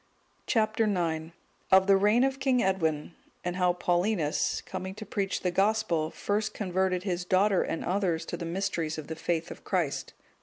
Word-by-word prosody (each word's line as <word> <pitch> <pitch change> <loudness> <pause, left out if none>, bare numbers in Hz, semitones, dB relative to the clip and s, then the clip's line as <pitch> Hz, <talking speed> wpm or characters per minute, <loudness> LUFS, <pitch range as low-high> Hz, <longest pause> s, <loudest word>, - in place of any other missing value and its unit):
Chap. 215 -1 +1
IX. 170 -7 0 0.4
Of 190 0 +7
the 195 0 +6
reign 210 +5 +4
of 270 0 0
King 265 -2 +2
Edwin, 165 -4 0 0.3
and 180 0 -2
how 180 -1 +3
Paulinus, 175 -2 0
coming 190 0 -5
to 215 - -8
preach 200 -1 -2
the 180 - 0
Gospel, 195 -5 +1
first 210 +4 -2
converted 185 -2 0
his 180 -3 -2
daughter 190 +2 +3
and 165 - -3
others 180 -3 0
to - - -4
the - - -6
mysteries 170 -2 -2
of 155 - -6
the 160 - -3
faith 165 +1 -2
of - - -10
Christ. 175 -7 -1
185 Hz, 175 wpm, -28 LUFS, 170-205 Hz, 0.4 s, Of